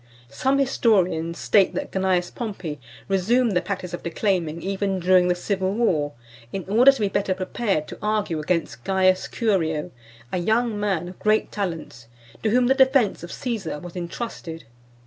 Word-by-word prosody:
Some 265 Hz, -, +1 dB
historians 185 Hz, -11 st, +2 dB
state 140 Hz, +9 st, +3 dB
that -, -, -3 dB
Cneius 185 Hz, -2 st, 0 dB
Pompey 190 Hz, -, -5 dB, 0.3 s
resumed 220 Hz, +6 st, +2 dB
the 180 Hz, -2 st, +2 dB
practice 180 Hz, -1 st, -5 dB
of 175 Hz, -, -4 dB
declaiming 170 Hz, -2 st, -1 dB
even 195 Hz, 0 st, -1 dB
during 180 Hz, 0 st, +4 dB
the 180 Hz, -, +2 dB
civil 190 Hz, +1 st, -1 dB
war, 155 Hz, -11 st, +1 dB, 0.4 s
in 195 Hz, -, -4 dB
order 235 Hz, +7 st, +7 dB
to 270 Hz, -, -7 dB
be 205 Hz, -, +2 dB
better 195 Hz, -1 st, 0 dB
prepared 185 Hz, -3 st, -1 dB
to -, -, -9 dB
argue 210 Hz, -6 st, 0 dB
against 150 Hz, -7 st, -2 dB
Caius 185 Hz, +1 st, +2 dB
Curio, 180 Hz, -8 st, 0 dB, 0.4 s
a 185 Hz, -, -1 dB
young 220 Hz, +3 st, +1 dB
man 190 Hz, -5 st, -1 dB
of 180 Hz, -, -11 dB
great 215 Hz, 0 st, +2 dB
talents, 165 Hz, -, -5 dB, 0.3 s
to 220 Hz, -, +1 dB
whom 245 Hz, +3 st, +3 dB
the 260 Hz, -, +4 dB
defence 265 Hz, -5 st, +3 dB
of 170 Hz, -, -8 dB
Caesar 220 Hz, -, -3 dB
was 175 Hz, +3 st, -10 dB
entrusted. 170 Hz, -2 st, -6 dB
190 Hz, 165 wpm, -24 LUFS, 170-215 Hz, 0.4 s, order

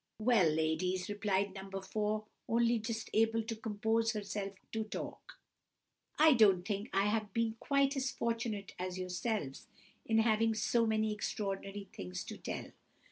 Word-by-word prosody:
"Well, 215 Hz, -6 st, +4 dB
ladies," 160 Hz, +5 st, 0 dB
replied 200 Hz, -1 st, 0 dB
No. 195 Hz, 0 st, -6 dB
4, 210 Hz, +2 st, -1 dB, 0.2 s
only 235 Hz, 0 st, +3 dB
just 225 Hz, 0 st, -4 dB
able 225 Hz, +1 st, +3 dB
to 225 Hz, +1 st, -4 dB
compose 220 Hz, +1 st, 0 dB
herself 200 Hz, -1 st, -3 dB, 0.2 s
to 220 Hz, 0 st, -1 dB
talk, -, -, -7 dB, 0.8 s
"I 310 Hz, 0 st, +7 dB
don't 195 Hz, -6 st, +5 dB
think 205 Hz, +3 st, -2 dB
I 195 Hz, -, +2 dB
have 210 Hz, 0 st, 0 dB
been 230 Hz, -1 st, +1 dB
quite 275 Hz, 0 st, +2 dB
as 265 Hz, -1 st, 0 dB
fortunate 230 Hz, -5 st, -2 dB
as 185 Hz, 0 st, -3 dB
yourselves 180 Hz, -, -3 dB, 0.4 s
in 225 Hz, -, +1 dB
having 225 Hz, 0 st, +3 dB
so 230 Hz, +1 st, +2 dB
many 220 Hz, -1 st, +1 dB
extraordinary 200 Hz, -1 st, -3 dB
things 90 Hz, -1 st, -5 dB
to -, -, -7 dB
tell. -, -, -5 dB
215 Hz, 145 wpm, -34 LUFS, 195-225 Hz, 0.8 s, I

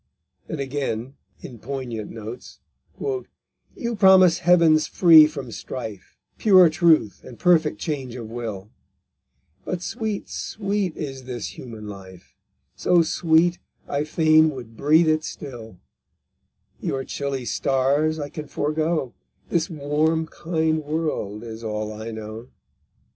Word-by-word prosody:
And 160 Hz, -, -4 dB
again, 135 Hz, -3 st, -3 dB, 0.3 s
in 120 Hz, -4 st, -10 dB
poignant 120 Hz, -4 st, -5 dB
notes: 115 Hz, +2 st, -9 dB, 0.4 s
_You 245 Hz, -, -6 dB
promise 185 Hz, -3 st, +6 dB
heavens 165 Hz, -3 st, +4 dB
free 160 Hz, -4 st, +7 dB
from 140 Hz, -6 st, -7 dB
strife, 110 Hz, -6 st, -7 dB, 0.2 s
Pure 185 Hz, -5 st, +7 dB
truth, 160 Hz, -, +3 dB
and 120 Hz, -, -11 dB
perfect 175 Hz, -, +3 dB
change 135 Hz, -5 st, -4 dB
of 120 Hz, -3 st, -7 dB
will; 110 Hz, -3 st, -6 dB, 0.9 s
But 180 Hz, -, -4 dB
sweet, 220 Hz, -2 st, -3 dB
sweet 200 Hz, -4 st, -3 dB
is 135 Hz, -4 st, -6 dB
this 125 Hz, -4 st, -5 dB
human 110 Hz, -4 st, -9 dB
life, 95 Hz, -3 st, -11 dB, 0.4 s
So 175 Hz, -2 st, +3 dB
sweet, 165 Hz, +2 st, +2 dB, 0.3 s
I 145 Hz, +1 st, -1 dB
fain 155 Hz, 0 st, +4 dB
would 120 Hz, -6 st, -9 dB
breathe 155 Hz, +6 st, +4 dB
it 155 Hz, 0 st, +2 dB
still; 120 Hz, -11 st, -8 dB, 1.0 s
Your 135 Hz, 0 st, -2 dB
chilly 135 Hz, -2 st, -4 dB
stars 140 Hz, +6 st, +1 dB
I 145 Hz, -2 st, -5 dB
can 155 Hz, 0 st, -7 dB
forego, 155 Hz, -2 st, -1 dB, 0.4 s
This 170 Hz, +1 st, 0 dB
warm, 155 Hz, +1 st, 0 dB
kind 160 Hz, -1 st, -1 dB
world 150 Hz, -9 st, -3 dB
is 115 Hz, 0 st, -8 dB
all 110 Hz, -1 st, -3 dB
I 110 Hz, +1 st, -7 dB
know_. 110 Hz, +1 st, -8 dB
145 Hz, 120 wpm, -23 LUFS, 115-160 Hz, 1.0 s, free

